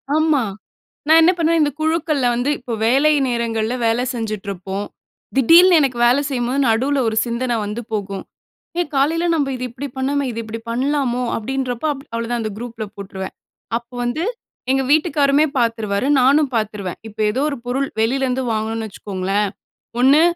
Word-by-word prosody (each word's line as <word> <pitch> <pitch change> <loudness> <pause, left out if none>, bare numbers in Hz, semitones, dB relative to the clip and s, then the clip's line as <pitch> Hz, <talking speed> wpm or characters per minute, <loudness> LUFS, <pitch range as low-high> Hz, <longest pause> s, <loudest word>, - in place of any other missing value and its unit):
ஆமா. 310 -3 +3 0.7
நான் 320 +1 +7
என்ன 355 +3 +6
பண்ணுவேன் 330 -1 +2
இந்த 290 - +2
குழுக்கள்ல 315 -4 +1
வந்து 245 +4 0
இப்போ 245 -2 -7
வேலை 280 +6 +4
நேரங்கள்ல 235 -1 -1
வேலை 230 +2 +2
செஞ்சுட்ருப்போம். 200 -3 -4 0.5
திடீல்னு 335 +6 +7
எனக்கு 260 -4 0
வேலை 250 +4 +4
செய்யும்போது, 255 +1 -1
நடுவுல 265 +6 +2
ஒரு 220 - -2
சிந்தனை 240 0 -1
வந்து 210 +3 -4
போகும். 200 -2 -3 0.6
ஏ - - +3
காலையில 320 +5 +2
நம்ம 285 -3 +1
இது 250 - -5
இப்படி 270 +4 -6
பண்ணோமே, 280 +2 0
இது 230 - -5
இப்படி 220 +1 -6
பண்ணலாமோ 255 0 0
அப்படின்றப்ப 255 +3 -3
அவ்வளோதான். 235 -3 -4
அந்த 215 -1 -3
குரூப்புல 230 -2 -6
போட்டுருவேன். 190 -1 -7 0.4
அப்போ 235 +1 -13
வந்து 245 +8 -1 0.5
எங்க 270 0 +2
வீட்டுக்காரருமே 300 -2 +3
பாத்துருவாரு, 225 -1 0
நானும் 280 +2 +4
பாத்துருவேன். 210 -4 -3
இப்ப 215 0 -14
ஏதோ 260 - -1
ஒரு 280 - -4
பொருள் 265 +3 -1
வெளிலேருந்து 260 +2 +1
வாங்கணும்னு 220 0 -2
வச்சுக்கோங்களேன். 195 0 -2 0.5
ஒண்ணு 275 +5 +6
245 Hz, 145 wpm, -20 LUFS, 220-280 Hz, 0.7 s, நான்